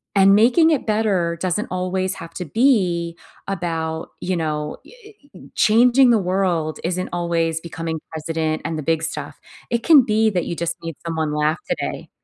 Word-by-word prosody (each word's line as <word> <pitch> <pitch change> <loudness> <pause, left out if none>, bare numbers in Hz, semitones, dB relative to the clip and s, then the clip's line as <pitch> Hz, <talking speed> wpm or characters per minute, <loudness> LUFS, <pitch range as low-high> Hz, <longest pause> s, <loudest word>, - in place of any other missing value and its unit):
and 195 0 +6
making 250 +10 +5
it 300 - 0
better 200 -6 0
doesn't 185 +3 -1
always 185 +1 -1
have 165 0 -10
to 180 - -4
be 175 - +1 0.3
about, 165 -4 -3
you 185 0 -1
know 150 -2 -3
eh - - -16 0.4
ee - - -14
changing 245 +3 +5
the 225 - +4
world 180 -4 -1
isn't 185 +2 -2
always 165 -2 0
becoming 165 -1 -5
president 160 0 -2
and 160 - -2
the 155 - -4
big 160 +2 +1
stuff. 160 - -5 0.3
It 235 0 +1
can 300 -5 +7
be 220 0 +2
that 180 -4 -1
you 170 - -4
just 170 0 -2
made 165 -2 -5
someone 160 -2 -2
laugh 150 +1 +1
today. - - -3
170 Hz, 170 wpm, -21 LUFS, 160-200 Hz, 0.4 s, can